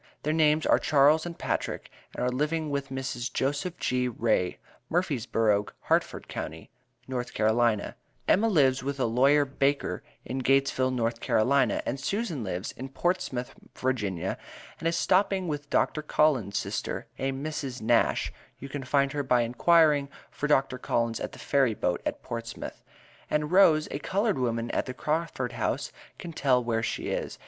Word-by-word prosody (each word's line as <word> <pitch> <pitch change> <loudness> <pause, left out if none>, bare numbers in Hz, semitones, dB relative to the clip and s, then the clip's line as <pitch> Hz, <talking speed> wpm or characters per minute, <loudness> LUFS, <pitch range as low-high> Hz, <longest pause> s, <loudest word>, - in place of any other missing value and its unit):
Their 155 - 0
names 155 -1 +3
are - - +4
Charles 150 +3 +4
and 170 - -7
Patrick - - -3 0.2
and - - -2
are 125 - +1
living 150 +3 -1
with 140 -1 -2
Mrs. 130 -2 -4
Joseph 145 +8 -1
G. 125 0 0
Wray 110 -6 0 0.3
Murphysborough 115 - +1
Hartford - - 0
county, - - -6 0.4
North 125 -1 -4
Carolina; 110 -1 +2 0.3
Emma 220 +4 +4
lives 135 -10 +3
with 140 +1 -4
a - - +2
Lawyer 135 +5 +4
Baker 140 +1 0 0.2
in 130 +3 -3
Gatesville 135 0 +2
North 115 -2 -1
Carolina 135 +6 +2
and 135 - -2
Susan 175 - -2
lives 95 0 -3
in 130 +2 -8
Portsmouth 135 -5 -2 0.2
Virginia 100 -8 -2 0.4
and 165 - -1
is 165 - +1
stopping 190 -1 +2
with 145 -2 -4
Dr. 155 - +1
Collins 140 -10 +2
sister - - -3
a 135 0 0
Mrs. 135 -2 -4
Nash 115 +1 +2 0.2
you 135 - -9
can 140 0 -5
find 140 +1 +2
her 145 - -3
out 140 - -3
by 125 -1 +4
enquiring 145 +4 +4 0.2
for 150 - -3
Dr. 135 -3 +2
Collins 115 -2 0
at - - -4
the - - -10
ferry 135 -6 +2
boat 90 -3 -1
at - - -4
Portsmouth, 115 0 -6 0.5
and 150 +1 0
Rose 165 -5 +5
a - - -3
coloured 200 - 0
woman 115 -2 -1
at - - -1
the 130 - -5
Crawford 155 -4 -2
House - - -2 0.3
can 170 -2 -8
tell 130 -4 +2
where 115 -1 0
she 115 - -3
is. - - -3
135 Hz, 165 wpm, -28 LUFS, 120-150 Hz, 0.5 s, Rose